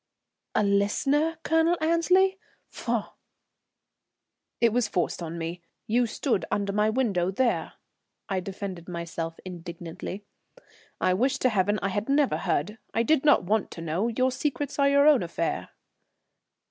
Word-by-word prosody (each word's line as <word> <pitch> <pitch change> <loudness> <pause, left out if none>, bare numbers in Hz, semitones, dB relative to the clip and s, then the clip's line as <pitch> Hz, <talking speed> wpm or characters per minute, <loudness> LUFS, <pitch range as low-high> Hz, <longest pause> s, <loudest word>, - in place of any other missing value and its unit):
"A - - +3
listener, 275 +11 +2
Colonel 325 +2 +3
Annesley? 360 +4 +3 0.3
Faugh!" - - -3 1.5
"It 235 -2 +3
was 245 -2 +2
forced 180 -3 -1
on 165 0 -5
me. 170 +1 -5 0.2
You 240 +2 +2
stood 230 -2 -1
under 200 -1 -1
my 210 +1 +2
window 215 -7 +1
there." 235 +5 0 0.5
I 190 -1 -1
defended 185 -2 -6
myself 170 -1 -5
indignantly. 175 +2 -7 0.7
"I 185 - +2
wish 255 +8 +1
to 255 - +2
heaven 205 -1 +1
I 195 - +1
had 205 +5 -3
never 280 0 +3
heard. 210 +9 -1 0.2
I 230 - +3
did 305 +2 +2
not 295 -8 +5
want 210 +3 0
to 165 - -8
know; 165 +7 -1
your 255 +3 +1
secrets 285 +2 -3
are 280 0 +5
your 280 +1 +5
own 295 -5 +6
affair." 165 -1 -2
210 Hz, 145 wpm, -27 LUFS, 180-275 Hz, 1.5 s, own